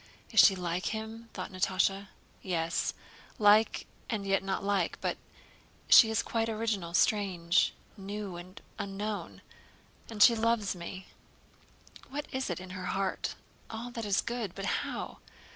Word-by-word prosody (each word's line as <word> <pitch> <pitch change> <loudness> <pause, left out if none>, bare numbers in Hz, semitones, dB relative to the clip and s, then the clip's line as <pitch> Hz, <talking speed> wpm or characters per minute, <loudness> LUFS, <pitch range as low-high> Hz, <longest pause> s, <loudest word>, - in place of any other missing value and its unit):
"Is - - +4
she 195 - +8
like 175 0 -2
him?" 225 +1 -5
thought - - -6
Natásha. 190 +1 +1 0.3
"Yes, 170 -2 -1 0.4
like 215 +1 +4 0.2
and 210 -4 -2
yet 195 -1 +2
not 195 0 -2
like. 200 -3 0
But - - -2 0.7
she 225 - +9
is 220 - +1
quite 225 -1 -1
original, 215 -6 -2
strange, 180 -6 +2 0.2
new, 200 -1 -6
and 180 +2 -10 0.2
unknown. 200 +1 -4 0.7
And 215 -2 +4
she 235 - +8
loves 225 -3 +1
me. 185 +2 -7 1.0
What 290 +2 -4
is 260 -3 -2
in 185 +1 -5
her 185 0 -6
heart? 190 +1 -2 0.3
All 230 +2 -6
that 230 -2 -5
is 200 -2 +2
good. 230 -6 -4
But 195 - -4 0.2
how? - - -5
200 Hz, 140 wpm, -31 LUFS, 185-220 Hz, 1.0 s, she